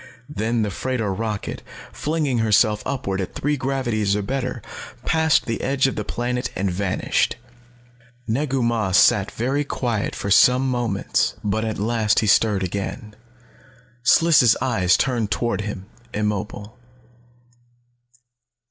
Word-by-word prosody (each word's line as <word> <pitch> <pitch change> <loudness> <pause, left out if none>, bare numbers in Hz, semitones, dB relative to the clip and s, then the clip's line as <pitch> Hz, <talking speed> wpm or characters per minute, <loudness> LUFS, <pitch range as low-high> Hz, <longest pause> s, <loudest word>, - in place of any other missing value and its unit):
Then 115 -4 -1
the 105 - -2
freighter 115 -1 -2
rocket, 105 0 -4 0.3
flinging 150 -5 -1
herself 105 -1 +3
upward 100 -8 -2
at 95 - -6
three 150 +1 0
gravities 120 -7 -1
or 105 - -1
better, 130 -1 -3 0.4
passed 160 -1 +2
the 115 - -3
edge 135 0 +1
of 135 - 0
the 105 - -3
planet 125 +3 -2
and 95 0 -1
vanished. 90 +1 0 0.9
Negu 130 +2 0
Mah 115 -5 0
sat 100 +1 +5
very 135 +5 -1
quiet 120 -6 -2
for 100 - -4
some 125 +6 +5
moments. 120 -6 0
But 105 +2 -1
at 110 -1 -3
last 110 0 +1
he - - 0
stirred 105 -1 +3
again. 100 +4 -5 0.9
Sliss' 130 -3 +5
eyes 95 -8 +2
turned 120 -5 0
toward 120 0 -1
him, 100 -2 -6 0.3
immobile. 105 +1 -3
115 Hz, 130 wpm, -22 LUFS, 105-130 Hz, 0.9 s, sat